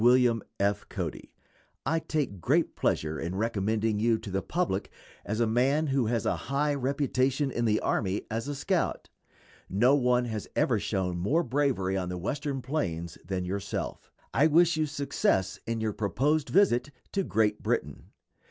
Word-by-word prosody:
WILLIAM 120 -2 +5 0.2
F. 100 +1 0
CODY: - - -5 0.5
I 165 - +2
take 145 - -2
great - - +2
pleasure 80 -1 0
in 85 +3 -3
recommending 110 0 0
you 115 +1 +3
to 100 - -8
the 95 +1 0
public 170 - -1 0.3
as 110 +2 -3
a 120 - +4
man 130 +7 +2
who 135 -5 +1
has 115 -1 0
a - - +2
high 145 +2 +1
reputation 135 0 0
in 120 -1 -1
the 110 -1 +3
army 95 -1 0
as 115 +4 -2
a 145 - -3
scout. 175 +5 -1 0.6
No 120 +8 +4
one 125 -3 +3
has 110 -3 -4
ever - - +2
shown 90 -2 -1
more 145 - +2
bravery 125 - 0
on 90 -1 -2
the 90 - -3
Western 135 - -3
plains 85 - -3
than 90 +1 -3
yourself. 95 +2 -4 0.2
I 150 - +5
wish 165 +2 +4
you 155 -1 +1
success 140 -10 0
in 115 0 -1
your 110 -1 -1
proposed 135 +10 0
visit 160 -9 +3 0.2
to 200 - +1
Great 110 - +1
Britain. - - -2
120 Hz, 165 wpm, -28 LUFS, 100-145 Hz, 0.6 s, WILLIAM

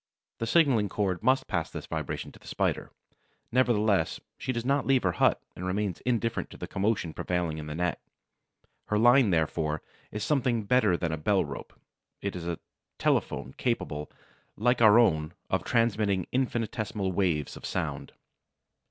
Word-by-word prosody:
The 115 - -2
signaling 125 -9 +4
cord 95 -2 -1
must 130 +3 +3
pass 85 -5 -2
this - - -7
vibration - - -4
to - - -17
the - - -17
Spider. - - -1 0.6
Nevertheless, 110 -5 +2 0.2
she 130 - -3
does 120 -1 -3
not 140 +1 +1
leave 135 -2 +3
her 95 - +2
hut 85 - +3 0.2
and 90 - -7
remains 95 0 -2
indifferent 115 -1 0
to - - -11
the - - -5
commotion 100 -5 -1
prevailing 85 -3 -2
in 75 - -7
the 75 - -5
net. 90 0 -1 0.8
Her 105 - 0
line, 120 +1 +6
therefore, 80 -2 0 0.3
is 105 0 -4
something 125 -5 +1
better 105 -5 +3
than 85 -2 -1
a 80 - -2
bell 75 - +2
rope; - - -9 0.4
it 100 -1 -3
is 85 -1 -5
a 85 -1 -2 0.4
telephone 65 - 0
capable, 75 - -2 0.5
like 120 +3 +2
our 110 -1 +8
own, 80 -8 +3 0.2
of - - +1
transmitting 105 -5 +1
infinitesimal 110 -6 -1
waves 85 -6 0
of - - -11
sound. - - -3
105 Hz, 160 wpm, -28 LUFS, 85-120 Hz, 0.8 s, our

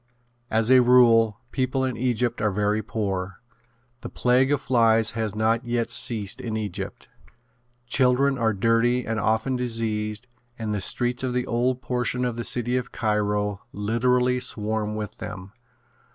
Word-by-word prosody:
As 110 +2 +1
a 130 -1 +7
rule 115 -4 +5
people 130 0 -1
in 130 -2 -2
Egypt 120 -1 -1
are 105 - +2
very 105 +2 0
poor. 95 -3 -4 0.6
The - - -7
plague 125 +2 +2
of 145 - +2
flies 115 -4 +3
has 110 -2 -3
not 110 +2 +1
yet 120 -1 -2
ceased 105 -5 0
in 110 -2 -3
Egypt. 105 -4 -6 0.8
Children 130 +2 +2
are 115 -3 +1
dirty 115 +4 +1
and 110 -1 -2
often 110 +5 0
diseased 110 -2 -2 0.3
and 110 -2 -3
the 105 - -2
streets 120 +6 -1
of 130 -1 -2
the 125 0 -1
old 125 +2 -1
portion 125 0 -1
of 120 -2 -2
the 120 - -4
city 120 +1 +2
of 125 -1 -4
Cairo 105 -2 -1
literally 125 +4 +1
swarm 110 -3 -2
with 105 0 -5
them. 95 0 -8
115 Hz, 150 wpm, -24 LUFS, 105-125 Hz, 0.8 s, a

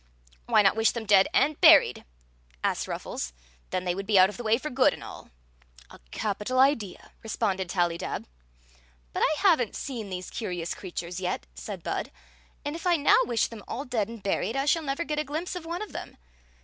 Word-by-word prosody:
"Why 210 - +5
not 195 - +4
wish 225 0 +3
them 235 -2 -5
dead 200 -2 +6
and 295 +4 +2
buried?" 315 - +7 0.6
asked - - 0
Ruffles. - - -5 0.4
"Then 185 - -2
they 175 - +1
would 195 +2 -5
be 210 -2 +4
out 185 0 +7
of 210 - -8
the - - -5
way 220 0 +3
for 305 +4 -5
good 255 +1 +3
and - - -12
all." - - -10 0.3
" - - -24
A - - -13
capital 210 - -2
idea! 255 -8 +1
responded 195 -4 -2
Tallydab. 175 -2 -1 0.4
" - - -32
But - - -2
I 310 - +3
have 360 -9 +5
n't 230 - -3
seen 230 -7 -5
these 185 -1 -6
curious 175 -6 -3
creatures 175 -1 -6
yet," 180 - -3
said 60 +1 -7
Bud; - - -3 0.3
" 65 - -33
and 290 +2 -3
if 335 +2 -4
I 350 - +5
now 295 -3 +5
wish 235 -2 +1
them 225 -3 -8
all 270 +5 -4
dead 230 -5 -1
and 230 -3 -10
buried, 200 +3 -1
I 275 0 0
shall 325 +3 +3
never 280 +2 -2
get 300 -2 -2
a - - +1
glimpse 310 +6 -4
of 340 -2 -6
one 345 +5 -3
of 425 - -9
them. - - -8
220 Hz, 215 wpm, -27 LUFS, 180-280 Hz, 0.6 s, buried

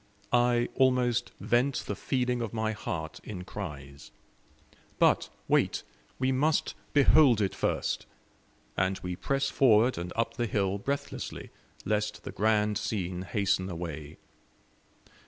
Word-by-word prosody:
I 120 0 +3
almost 125 -2 +2
vent 125 +4 +1
the 105 - -3
feeling 125 +2 -1
of 115 -2 -4
my 110 0 0
heart 80 -6 -5
in 90 -4 -6
cries. 70 -8 -8 0.9
But - - +3 0.2
wait, - - +2 0.3
we 130 0 +1
must 145 +4 +1 0.2
behold 140 -4 +6
it 100 -2 0
first. - - -1 0.7
And 95 +1 +1
we 90 0 -3
press 135 +6 -1
forward 120 -3 +4
and 90 +1 -5
up 115 0 -1
the 120 - 0
hill 100 -2 0
breathlessly, 140 +6 -4 0.3
lest 105 0 -1
the - - -6
grand 105 -1 +2
scene 90 -4 -3
hasten 95 -1 0
away. 80 -3 -6
110 Hz, 125 wpm, -29 LUFS, 95-125 Hz, 0.9 s, behold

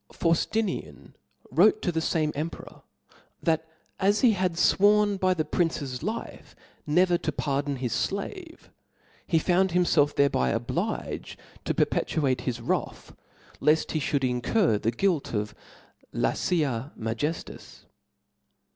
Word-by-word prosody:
V - - -18
Fauftinian 165 - -1 0.4
wrote 195 +10 +5
to 175 - +1
the 165 - -1
fanrae 160 -1 0
emperor, 155 +3 -6 0.6
that 160 -1 +1 0.3
as 200 +2 +2
he 245 - +6
had 185 -4 0
fworn 205 +3 +3
by 185 0 +2
the 155 -3 -1
prince's 145 -7 -1
life 220 +2 -6 0.3
never 175 +3 +3
to 160 - -2
pardon 140 0 -1
his 125 -2 -1
flave, 325 - -7 0.6
he 165 - +2
found 180 +2 +2
himfelf 160 -5 +3
thereby 140 - +2
obliged - - -3 0.3
to - - -1
per - - +4
petuate 135 -5 -1
his 125 -2 -3
wrath, - - -3 0.4
left 150 +2 +2
he 155 - 0
Ihould 140 -2 0
incur 125 - +1
the 110 - 0
guilt 150 - 0
of 105 0 -2 0.6
lafa 145 -6 0
Majejias. 115 +9 -5
160 Hz, 130 wpm, -27 LUFS, 135-185 Hz, 0.6 s, he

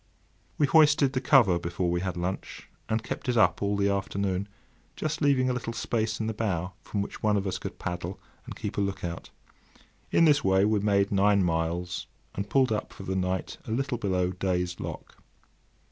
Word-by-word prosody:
We 150 - +4
hoisted 150 -3 +5
the 130 - 0
cover 120 - +5
before 85 +1 -2
we 85 0 0
had 95 -2 -3
lunch, 90 +2 -4 0.2
and 110 0 0
kept - - -4
it 120 - +1
up 90 -5 +4
all 100 0 0
the 100 0 +2
afternoon, 100 0 -1 0.5
just 155 +1 -3
leaving 140 -3 +3
a 125 - +1
little 115 -2 -4
space 110 -2 -1
in 110 - -1
the 110 - -1
bow, 95 -4 -2
from 100 -1 -2
which - - -9
one 105 -1 +2
of 100 - -1
us 95 - -2
could - - -7
paddle 90 +1 -4 0.3
and - - -7
keep - - -4
a - - +2
look 100 -1 -2
out. 85 -1 -5 0.8
In 165 - +4
this 150 -2 +4
way 95 +1 +4
we 105 0 +2
made 100 -1 +2
nine 100 0 +4
miles, 85 +1 -1 0.3
and 100 +1 -4
pulled 130 -1 +3
up 105 - -2
for - - -10
the 95 0 -3
night 95 0 -2
a - - -4
little 130 0 -1
below 90 -4 0
Day's 90 -1 -2
Lock. - - -7
100 Hz, 200 wpm, -28 LUFS, 90-115 Hz, 0.8 s, hoisted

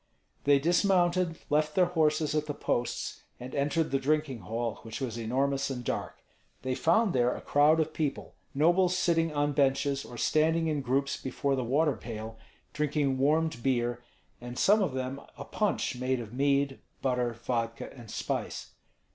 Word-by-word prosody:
They 140 0 +6
dismounted, 175 +1 +2
left 150 0 +2
their 185 - +5
horses 155 -3 +1
at 150 0 0
the 145 - -3
posts, 120 0 -2 0.2
and 125 +1 -8
entered 145 +3 0
the 135 - +2
drinking 145 -2 0
hall, 115 +4 -3
which 115 -1 -7
was 125 -5 -3
enormous 135 +4 0
and 125 -2 -4
dark. - - -4 0.4
They 130 0 -1
found 180 - +2
there 125 -1 +2
a - - -6
crowd 150 +3 +4
of 155 0 0
people, 150 -3 -3 0.2
nobles 175 +5 +3
sitting 165 -2 +2
on 145 0 +1
benches 140 0 +1
or 120 - -10
standing 160 +4 +2
in 150 -3 0
groups 140 +2 0
before 135 +1 -1
the 130 - -1
water 140 +4 +2
pail, 110 0 -7 0.3
drinking 145 -2 0
warmed 155 0 +2
beer, 120 -2 0 0.4
and 120 0 -7
some 210 +2 +4
of 160 -9 0
them 130 +1 -3 0.2
a - - -7
punch - - -1
made 130 +1 -1
of 115 -1 -8
mead, 140 0 +1 0.2
butter, 125 -2 0
vudka, 115 -1 -3
and 120 -4 -12
spice. - - -4
140 Hz, 165 wpm, -29 LUFS, 125-155 Hz, 0.4 s, They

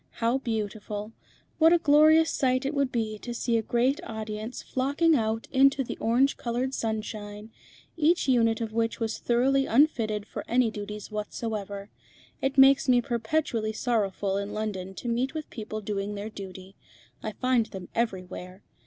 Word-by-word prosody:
How 235 +3 0
beautiful! 215 -3 -4 0.5
What 325 +1 +7
a 345 - +6
glorious 315 +1 +5
sight 255 0 +1
it 275 - -1
would 280 -2 0
be 215 -3 -2
to 240 +1 -6
see 235 0 0
a 225 - +3
great 245 +6 +1
audience 220 -1 -6
flocking 285 +5 +2
out 225 -2 -1
into 275 0 +4
the - - -5
orange 250 +5 +2
coloured 245 +2 -2
sunshine, 215 -1 -4 0.4
each 330 0 +2
unit 230 -3 +3
of 220 -1 -3
which 230 0 0
was 225 -1 -2
thoroughly 270 +3 +2
unfitted 225 -6 +2
for - - -6
any 245 -2 +2
duties 210 0 -7
whatsoever. 210 -1 -5 0.5
It 270 +1 -1
makes 270 0 +6
me 245 -1 +6
perpetually 235 -2 -1
sorrowful 205 -4 0
in 200 +1 -4
London 190 -3 -4
to 240 - -7
meet 245 +5 -1
with 310 -1 -5
people 215 -1 -5
doing 205 0 -3
their 205 +2 -5
duty. 190 -1 -9 0.5
I 215 - -4
find 250 0 +1
them 185 -2 -8
everywhere. 185 -4 -4
230 Hz, 160 wpm, -27 LUFS, 210-260 Hz, 0.5 s, What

